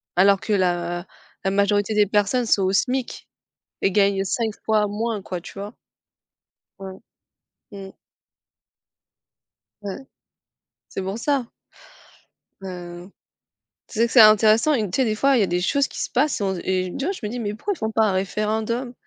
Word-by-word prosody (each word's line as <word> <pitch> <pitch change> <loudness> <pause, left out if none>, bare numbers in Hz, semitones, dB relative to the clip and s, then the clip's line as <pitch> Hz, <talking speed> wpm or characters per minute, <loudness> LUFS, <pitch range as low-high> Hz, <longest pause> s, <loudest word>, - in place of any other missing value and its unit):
Alors 195 +1 +5
que 215 - -2
la 175 -2 0 0.4
la 195 - 0
majorité 205 +1 +1
des 210 -1 +5
personnes 210 +5 +1
sont 205 - +2
au 185 - +1
SMIC 250 +5 -1 0.5
et 195 - +2
gagnent 195 -1 +2
5 225 +2 -1
fois 215 -1 +2
moins 215 0 -3
quoi, 180 -1 -5
tu - - -12
vois? 205 +3 -7 1.1
Ouais. 190 -1 -9 0.7
Mmh. 195 -1 -9 1.9
Ouais. 200 -2 -5 0.9
C'est 195 - -5
pour 195 +3 -4
ça. 275 0 0 1.2
Ben, 190 - -6 0.4
heu. - - -20 0.8
Tu 220 - -7
sais 235 - +4
que - - -11
c'est 245 - +7
intéressant. 215 +6 +6
Une 215 -7 0
tu - - -2
sais, - - +3
des 215 -1 0
fois, 275 +2 +3
il 210 - +3
y - - 0
des 175 +1 -1
choses 280 +8 +1
qui - - -7
se - - -3
passent 260 -2 0
et - - 0
on 190 -1 -1
et 185 0 -2
ouais 345 +9 -2
je - - -9
me - - -2
dis: 245 +2 -5
«Mais 210 -2 -3
pourquoi 405 - -3
ils - - -16
font 220 0 -3
pas 220 0 +2
un - - +1
référendum 220 +6 -2
210 Hz, 180 wpm, -22 LUFS, 195-230 Hz, 1.9 s, c'est